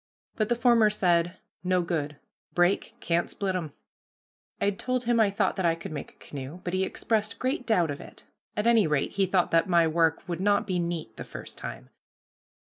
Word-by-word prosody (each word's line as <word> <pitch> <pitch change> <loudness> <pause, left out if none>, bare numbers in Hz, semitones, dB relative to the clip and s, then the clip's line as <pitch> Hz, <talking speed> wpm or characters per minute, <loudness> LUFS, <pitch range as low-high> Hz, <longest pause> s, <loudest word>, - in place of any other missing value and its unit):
But 215 -2 0
the 240 - +3
former 235 -2 +5
said, 175 -4 +1 0.3
"No 180 -1 +2
good, 150 -4 -2 0.4
break, 175 +2 +2
can't 170 0 0
split 195 -2 -2
'em." 165 -5 -3 0.9
I 200 - +2
told 255 +5 -2
him 235 -1 +2
I 215 -2 +5
thought 200 0 0
that 190 - 0
I 165 - +3
could 165 - -8
make 145 -2 -5
a - - -18
canoe, 140 +4 -7
but 175 - -3
he 185 0 +2
expressed 215 +2 -1
great 255 -1 -2
doubt 175 -9 +3
of 140 - -6
it; - - -13 0.3
at 210 - 0
any 230 -6 +5
rate 150 -3 0
he 195 -1 +1
thought 180 -1 +2
that 165 +4 +3
my 170 -2 +5
work 165 +2 +1
would 175 0 -3
not 205 +1 +3
be 185 -3 -1
"neat" 170 -2 -3
the - - -5
first - - -9
time. - - -7
185 Hz, 205 wpm, -27 LUFS, 170-210 Hz, 0.9 s, former